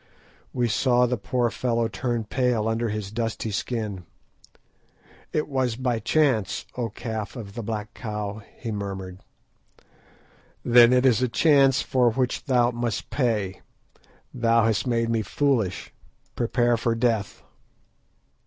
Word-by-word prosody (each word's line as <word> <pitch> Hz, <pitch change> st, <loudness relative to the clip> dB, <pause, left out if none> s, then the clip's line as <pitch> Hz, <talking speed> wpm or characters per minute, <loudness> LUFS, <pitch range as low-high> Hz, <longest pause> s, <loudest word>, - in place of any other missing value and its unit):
We 120 Hz, -1 st, 0 dB
saw 125 Hz, +2 st, +3 dB
the 125 Hz, +1 st, 0 dB
poor 120 Hz, +2 st, -1 dB
fellow 115 Hz, -1 st, 0 dB
turn 115 Hz, +2 st, -2 dB
pale 120 Hz, -1 st, 0 dB
under 115 Hz, +1 st, 0 dB
his 105 Hz, -2 st, -4 dB
dusky 115 Hz, 0 st, -3 dB
skin. 105 Hz, -3 st, -3 dB, 1.3 s
"It 155 Hz, -, -1 dB
was 130 Hz, -5 st, 0 dB
by 125 Hz, -2 st, -1 dB
chance, 120 Hz, -4 st, +1 dB
O 120 Hz, -2 st, -2 dB
Calf 110 Hz, 0 st, -5 dB
of 105 Hz, -5 st, -8 dB
the 120 Hz, -, -5 dB
Black 105 Hz, -1 st, -5 dB
Cow," 105 Hz, -2 st, -5 dB, 0.2 s
he 115 Hz, -, -5 dB
murmured. 95 Hz, -3 st, -5 dB, 1.5 s
"Then 120 Hz, 0 st, +7 dB
it 125 Hz, +1 st, +3 dB
is 125 Hz, -2 st, +4 dB
a 125 Hz, -, +1 dB
chance 135 Hz, +1 st, +4 dB
for 125 Hz, -2 st, +2 dB
which 125 Hz, +2 st, -1 dB
thou 125 Hz, -4 st, +3 dB
must 120 Hz, -1 st, -3 dB
pay. 105 Hz, -8 st, -1 dB, 0.7 s
Thou 115 Hz, -2 st, +3 dB
hast 115 Hz, +3 st, 0 dB
made 115 Hz, -1 st, +1 dB
me 115 Hz, -1 st, +1 dB
foolish; 110 Hz, -, -1 dB, 0.4 s
prepare 120 Hz, 0 st, +1 dB
for 115 Hz, 0 st, 0 dB
death." 115 Hz, -4 st, -1 dB
115 Hz, 135 wpm, -25 LUFS, 110-125 Hz, 1.5 s, Then